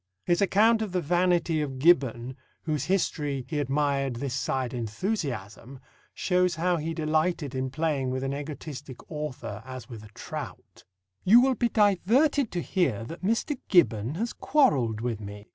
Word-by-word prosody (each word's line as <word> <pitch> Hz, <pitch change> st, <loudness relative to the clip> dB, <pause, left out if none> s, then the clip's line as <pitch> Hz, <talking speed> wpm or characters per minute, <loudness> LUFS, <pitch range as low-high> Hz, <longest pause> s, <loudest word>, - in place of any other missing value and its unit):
His 175 Hz, +2 st, +2 dB
account 220 Hz, +3 st, +4 dB
of 210 Hz, -4 st, -3 dB
the 180 Hz, -, +1 dB
vanity 175 Hz, -1 st, +1 dB
of 135 Hz, -3 st, -4 dB
Gibbon, 130 Hz, -5 st, +2 dB, 0.3 s
whose 155 Hz, -3 st, -1 dB
history 145 Hz, -8 st, -1 dB
he 155 Hz, -2 st, -2 dB
admired 140 Hz, -2 st, 0 dB
this 130 Hz, +1 st, -3 dB
side 130 Hz, -1 st, -2 dB
enthusiasm, 125 Hz, -, -4 dB, 0.4 s
shows 180 Hz, -1 st, +1 dB
how 175 Hz, +2 st, +1 dB
he 160 Hz, +1 st, -3 dB
delighted 155 Hz, -2 st, 0 dB
in 130 Hz, 0 st, -2 dB
playing 145 Hz, -2 st, -1 dB
with 130 Hz, +1 st, -2 dB
an 135 Hz, 0 st, -2 dB
egoistic 145 Hz, -2 st, -7 dB
author 150 Hz, -9 st, -5 dB
as 130 Hz, +1 st, -9 dB
with 110 Hz, -3 st, -9 dB
a 105 Hz, -, -13 dB
trout: -, -, -8 dB, 0.4 s
You 225 Hz, +6 st, +7 dB
will 260 Hz, +1 st, +4 dB
be 240 Hz, -1 st, 0 dB
diverted 230 Hz, -, +3 dB
to 175 Hz, -, -2 dB
hear 135 Hz, -, 0 dB
that 165 Hz, +9 st, -8 dB
Mr. 230 Hz, +7 st, 0 dB
Gibbon 130 Hz, -, +3 dB
has 230 Hz, +6 st, -2 dB
quarrelled 140 Hz, -, +2 dB
with 115 Hz, -3 st, -2 dB
me. 105 Hz, +1 st, -9 dB
150 Hz, 160 wpm, -27 LUFS, 130-180 Hz, 0.4 s, You